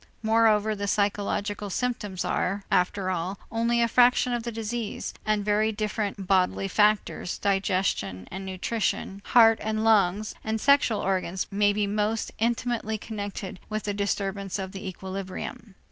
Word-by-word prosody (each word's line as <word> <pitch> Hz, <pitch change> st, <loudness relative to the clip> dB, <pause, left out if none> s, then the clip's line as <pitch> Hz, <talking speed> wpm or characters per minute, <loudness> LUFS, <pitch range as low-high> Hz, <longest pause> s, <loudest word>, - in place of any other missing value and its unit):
Moreover 220 Hz, -1 st, +3 dB
the 200 Hz, -1 st, -3 dB
psychological 205 Hz, 0 st, -1 dB
symptoms 210 Hz, -4 st, -2 dB
are, 195 Hz, +2 st, -1 dB
after 185 Hz, +1 st, +1 dB
all, 180 Hz, +2 st, -2 dB
only 235 Hz, +1 st, +2 dB
a -, -, +3 dB
fraction 245 Hz, +1 st, +4 dB
of 240 Hz, -, -1 dB
the 235 Hz, +1 st, -4 dB
disease 225 Hz, 0 st, -4 dB
and 210 Hz, -1 st, +1 dB
very 215 Hz, +1 st, +2 dB
different 210 Hz, -2 st, -3 dB
bodily 190 Hz, 0 st, +2 dB
factors, 210 Hz, -2 st, +1 dB
digestion 190 Hz, -, 0 dB
and 190 Hz, +1 st, -5 dB
nutrition, 195 Hz, +1 st, -2 dB
heart 225 Hz, -2 st, +6 dB
and 215 Hz, 0 st, -1 dB
lungs 210 Hz, -2 st, +3 dB
and 220 Hz, 0 st, -1 dB
sexual 280 Hz, -4 st, +3 dB
organs 185 Hz, -1 st, -1 dB
may 205 Hz, +1 st, +3 dB
be 205 Hz, 0 st, 0 dB
most 210 Hz, +2 st, -1 dB
intimately 230 Hz, -1 st, 0 dB
connected 205 Hz, -3 st, -6 dB
with 215 Hz, 0 st, -3 dB
the 205 Hz, -, -2 dB
disturbance 200 Hz, -1 st, -2 dB
of 190 Hz, -1 st, -5 dB
the 195 Hz, 0 st, -7 dB
equilibrium. 190 Hz, +2 st, -6 dB
205 Hz, 145 wpm, -26 LUFS, 195-220 Hz, -, heart